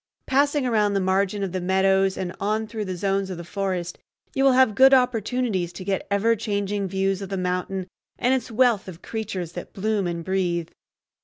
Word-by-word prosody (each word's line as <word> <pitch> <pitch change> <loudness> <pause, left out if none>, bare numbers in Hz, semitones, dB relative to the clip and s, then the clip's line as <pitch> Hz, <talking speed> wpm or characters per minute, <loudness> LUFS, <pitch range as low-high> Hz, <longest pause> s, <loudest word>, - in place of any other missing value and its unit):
Passing 285 +1 +2
around 210 -4 +2
the - - +3
margin 195 +2 +1
of 190 - -2
the 185 0 -3
meadows 190 +1 +2
and 180 -1 -4
on 215 +2 0
through 215 -1 -5
the 185 -1 -4
zones 195 +1 0
of 185 - -5
the 170 - -7
forest, 180 0 -3 0.3
you 270 - +1
will 270 -1 +6
have 255 -4 +5
good 265 +4 +7
opportunities 235 -6 0
to 180 - -7
get 195 0 -2
ever 210 +3 +2
changing 205 -2 -2
views 195 +1 -1
of 195 - -6
the 195 - -2
mountain 180 +1 -2 0.3
and 250 +2 +2
its 260 -3 -1
wealth 230 -3 +2
of 180 -2 -10
creatures 195 -6 -4
that 175 - -8
bloom 205 -2 0
and 170 -1 -4
breathe. 175 -3 -1
195 Hz, 200 wpm, -24 LUFS, 185-220 Hz, 0.3 s, good